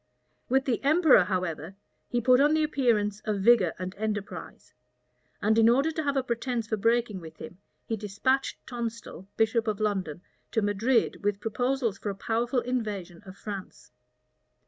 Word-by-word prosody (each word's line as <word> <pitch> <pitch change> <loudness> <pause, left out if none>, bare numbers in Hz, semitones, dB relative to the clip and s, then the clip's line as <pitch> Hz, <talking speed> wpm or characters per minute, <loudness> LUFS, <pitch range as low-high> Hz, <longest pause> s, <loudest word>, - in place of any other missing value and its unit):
With 265 +2 +2
the 255 -3 -1
emperor, 305 - +5
however, 180 -2 -3 0.3
he 240 - 0
put 250 +2 +5
on 295 +2 +4
the 315 - +2
appearance 230 -8 +1
of 210 -3 -1
vigor 215 -7 +5
and 185 +1 -5
enterprise; 210 -2 -5 0.7
and 220 +2 +3
in 225 0 +6
order 275 +7 +3
to 315 - -3
have 280 -2 -1
a 265 - +1
pretence 235 -1 -2
for 220 - -1
breaking 230 -2 +1
with 160 -1 -11
him, 180 - -10 0.3
he 225 - -2
despatched 215 +6 -1
Tonstal, 230 -5 -6
bishop 225 +1 +2
of 215 -1 -1
London, 190 -6 -2 0.3
to 220 - +1
Madrid 220 +4 +1
with 205 -1 0
proposals 245 -1 -1
for 210 - -4
a 200 - -3
powerful 235 +5 0
invasion 210 -9 -4
of 190 +1 -11
France. 195 - -8
220 Hz, 165 wpm, -27 LUFS, 200-250 Hz, 0.7 s, in